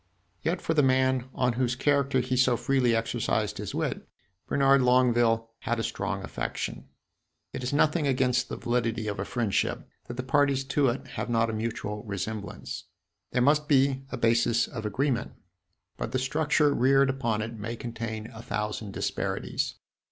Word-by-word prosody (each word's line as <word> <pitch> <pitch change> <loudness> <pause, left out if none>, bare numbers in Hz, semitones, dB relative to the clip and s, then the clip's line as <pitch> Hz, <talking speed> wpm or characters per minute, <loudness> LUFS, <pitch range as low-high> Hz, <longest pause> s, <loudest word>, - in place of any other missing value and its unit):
Yet - - -1
for 160 - +1
the 155 - +4
man 130 -1 +2
on 125 -1 +2
whose 125 0 0
character 140 -1 +2
he 125 +1 -1
so 125 -1 +4
freely 125 -3 +2
exercised 115 - -1
his - - -5
wit - - -3 0.4
Bernard 140 -1 +4
Longueville 120 -2 +3
had 120 0 -1
a - - -1
strong - - -3
affection. - - -4 0.7
It - - -4
is 125 - -2
nothing 150 +1 +2
against 130 -1 +1
the - - -4
validity 115 -2 -1
of 100 -2 -3
a 100 - -1
friendship 115 -5 -1 0.2
that 120 - -7
the 130 - -2
parties 140 0 +2
to 140 +1 +2
it 120 +2 -1
have - - -4
not 115 -1 +2
a - - -6
mutual 110 -2 -3
resemblance. 100 0 -5 0.4
There 125 - +1
must 150 +2 +3
be 135 -2 +3
a - - -4
basis 115 0 +3
of 110 -3 -5
agreement, 125 +3 -1 0.6
but - - -4
the - - +2
structure 150 +2 +2
reared 135 +1 +4
upon 120 -5 -1
it 115 0 -6
may 115 +3 -4
contain 115 -2 -5
a 110 - -9
thousand 105 -2 -3
disparities. - - -2
125 Hz, 165 wpm, -28 LUFS, 115-135 Hz, 0.7 s, the